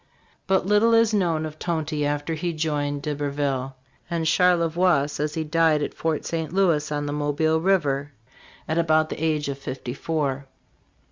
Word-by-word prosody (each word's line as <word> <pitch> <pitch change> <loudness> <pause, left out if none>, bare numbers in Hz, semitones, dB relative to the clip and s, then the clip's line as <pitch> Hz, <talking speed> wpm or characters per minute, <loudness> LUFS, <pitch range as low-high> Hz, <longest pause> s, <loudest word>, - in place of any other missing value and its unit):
* - - -36
But 190 -2 +2
little 210 +3 +4
is 225 -1 +4
known 170 -6 +1
of 155 0 -8
Tonty 155 -3 -2
after 145 +2 -2
he 170 +2 -2
joined 145 -2 -2
D'Iberville; 140 -3 -2 0.3
and 165 -2 -1
Charlevoix 170 -3 +3
says 150 +1 -3
he 160 - -1
died 155 -1 +2
at - - -4
Fort 160 -2 -2
St. 160 -2 -3
Louis 165 -6 +2
on 145 0 -2
the 145 - -3
Mobile 150 +2 +1
river, 145 -7 +1 0.6
at 160 +2 0
about 155 -1 +2
the 155 - -5
age 155 -2 0
of 140 -1 -4
fifty 130 -2 -5
four. 140 -2 -2
155 Hz, 165 wpm, -24 LUFS, 145-170 Hz, 0.6 s, little